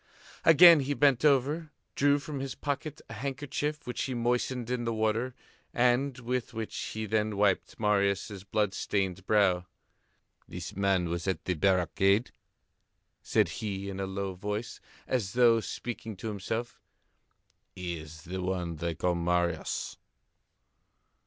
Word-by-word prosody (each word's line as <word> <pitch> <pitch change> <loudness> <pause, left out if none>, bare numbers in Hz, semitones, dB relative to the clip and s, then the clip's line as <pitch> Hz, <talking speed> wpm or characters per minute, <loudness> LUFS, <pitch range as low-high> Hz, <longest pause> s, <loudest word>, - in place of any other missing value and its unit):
Again 165 0 +9
he 140 +1 -1
bent 140 -3 +3
over, 150 +3 +2 0.2
drew 145 0 +3
from 145 0 -5
his 135 -1 -4
pocket 150 +1 -4
a - - -9
handkerchief 145 +4 -3
which 125 -1 -3
he 130 - -2
moistened 120 0 -1
in 125 -1 -1
the 115 -1 -1
water 110 +3 0 0.4
and 125 +2 +2
with 125 -1 -3
which 110 -1 -4
he 110 0 -4
then 105 0 0
wiped 100 -2 +1
Marius' 100 -1 +1
blood 100 0 0
stained 95 -3 -1
brow. 95 -4 +3 0.8
"This - - -7
man 95 -2 +2
was 85 +2 -3
at 95 - -1
the 90 - +1
barricade," 95 +5 +2 0.9
said - - +2
he 100 -2 -3
in 95 - -6
a 95 - -2
low 95 0 -3
voice 105 +5 -4 0.3
and 130 - +1
as 100 -6 -5
though 120 -2 +5
speaking 115 -1 -5
to 110 - -4
himself. 110 +4 -4 0.9
"He 90 -2 -4
is 80 +1 -11
the 95 +2 -5
one 90 -3 -2
they 85 +1 -2
called 90 +1 0
Marius." 85 -1 -1
110 Hz, 145 wpm, -29 LUFS, 95-125 Hz, 0.9 s, Again